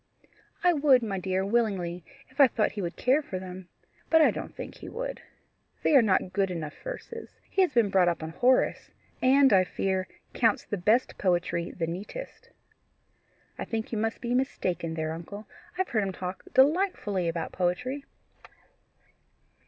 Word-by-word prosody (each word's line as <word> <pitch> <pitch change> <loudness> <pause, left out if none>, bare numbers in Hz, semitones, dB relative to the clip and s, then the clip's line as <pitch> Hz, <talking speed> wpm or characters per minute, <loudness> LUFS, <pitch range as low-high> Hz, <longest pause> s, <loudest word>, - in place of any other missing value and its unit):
"I 355 0 +5
would, 280 -5 +4
my 200 -4 -2
dear, 190 +1 -1
willingly, 195 -6 0 0.3
if 260 +3 -23
I 275 - +9
thought 220 -3 0
he 205 - -5
would 175 -1 -4
care 265 +5 +2
for 200 -10 -6
them. 185 0 -8 0.4
But 325 - +6
I 315 - +6
don't - - -7
think - - -8
he - - -9
would. - - -5 0.6
They 305 - +4
are 270 - +9
not 190 -4 +1
good 195 -2 +1
enough 165 -4 -5
verses. - - -7 0.2
He 390 - +2
has 365 - +3
been 230 -6 +2
brought 185 -2 +4
up 170 -2 0
on 160 - -5
Horace, 250 +9 +2 0.3
and, 270 0 +5
I 185 -1 +6
fear, 185 0 -2 0.3
counts 225 -3 +2
the - - -3
best 215 +7 +1
poetry 175 -2 0
the 165 - -3
neatest." 200 - -7 1.1
"I - - -2
think 225 -1 -4
you 220 - -1
must 225 +1 -2
be 240 0 -2
mistaken 180 -10 -1
there, 160 0 -2
uncle; 200 +6 -8 0.3
I - - -18
have 375 - -2
heard 220 - +1
him 195 -2 -2
talk 185 +1 -6
delightfully 265 - +2
about 165 -1 -3
poetry." 250 +11 -2
205 Hz, 175 wpm, -28 LUFS, 180-260 Hz, 1.1 s, I